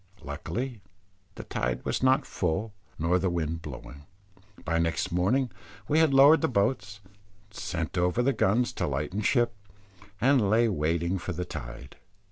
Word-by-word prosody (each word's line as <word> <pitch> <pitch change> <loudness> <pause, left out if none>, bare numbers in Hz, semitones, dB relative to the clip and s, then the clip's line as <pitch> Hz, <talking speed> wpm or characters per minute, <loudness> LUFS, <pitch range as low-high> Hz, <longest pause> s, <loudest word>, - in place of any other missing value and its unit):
Luckily 110 - -5 0.5
the - - -7
tide 65 0 -3
was - - -1
not 130 +2 +3
full 95 +5 -2 0.2
nor 85 +3 +2
the 95 +1 0
wind 80 -1 -2
blowing. 70 0 -10 0.6
By 85 0 +1
next 85 0 0
morning 110 +9 +1 0.4
we 155 +2 +3
had 160 -3 +4
lowered 140 +4 +7
the 160 - +2
boats, 100 - -1
and 100 +1 -28
sent 85 -2 -3
over 90 +7 +2
the 135 +2 +2
guns 120 +4 +1
to - - -2
lighten 75 +9 -2
ship, 120 +2 +2 0.7
and 130 -5 +3
lay 115 +3 +4
waiting 85 +1 0
for 90 - -4
the 90 +2 -3
tide. - - -8
95 Hz, 155 wpm, -28 LUFS, 85-120 Hz, 0.7 s, lowered